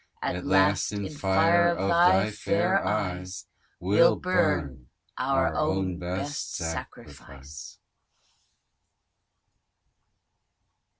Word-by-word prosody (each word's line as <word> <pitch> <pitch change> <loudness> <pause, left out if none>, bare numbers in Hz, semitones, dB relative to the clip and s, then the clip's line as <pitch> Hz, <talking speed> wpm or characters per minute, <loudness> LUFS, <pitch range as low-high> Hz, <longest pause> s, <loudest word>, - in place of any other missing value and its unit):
At - - -3
last, - - +2
in 100 -1 -4
fire 155 - +2
of - - -2
thy 170 - +4
fair 175 - 0
eyes, 95 -2 -3 0.3
We'll 100 - +4
burn, 85 - -1 0.3
our 135 +1 0
own 95 - -1
best 95 +12 -4
sacrifice. 75 -4 -8
100 Hz, 75 wpm, -26 LUFS, -, 0.3 s, thy